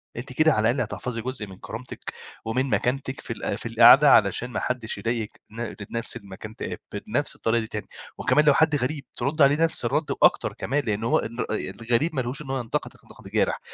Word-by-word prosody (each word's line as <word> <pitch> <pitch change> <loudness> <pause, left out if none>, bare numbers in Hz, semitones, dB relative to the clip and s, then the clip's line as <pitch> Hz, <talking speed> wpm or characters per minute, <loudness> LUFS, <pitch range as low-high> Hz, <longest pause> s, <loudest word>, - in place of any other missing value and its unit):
أنتِ 125 +2 -7
كده 155 +4 +4
على 110 +1 +2
الأقل 125 +1 -1
هتحفظي 120 -2 -4
جزء 125 -3 -4
من 95 -1 -12
كرامتِك 115 +5 -8 0.3
ومن 130 +4 0
مكانتِك 130 +2 -1
في - - -4
ال - - -3
في - - -7
القعدة 120 +5 +7
علشان 105 +4 +4
ما - - -3
حدّش 125 -3 -3
يضايق 115 -2 -2 0.2
ن 115 0 -5 0.2
نَفْس 115 0 0
المكان 100 +2 -10
ت - - -5 0.3
بنَفْس - - 0
الطريقة 115 +1 +1
دي 110 - -5
تاني، 105 -1 -6 0.3
وكمان 150 - +3
لو 145 - +7
حد 160 +1 +3
غريب 140 +2 -2
ترُدّي 140 +5 +2
عليه 145 +4 +4
نَفْس 160 -6 0
الرَد 145 +6 0
وأكتر - - +3
كمان، 145 +4 -1
لإن 105 0 -1
هو 115 - +3
ان 115 +2 -3
الغريب 120 +8 -1
ما 130 - +1
لهوش 125 +4 -4
إن 145 - -9
هو 135 - -1
ينقدِك 120 -2 -3
نَقْد - - -14
جارح. - - +1
125 Hz, 205 wpm, -25 LUFS, 115-140 Hz, 0.3 s, القعدة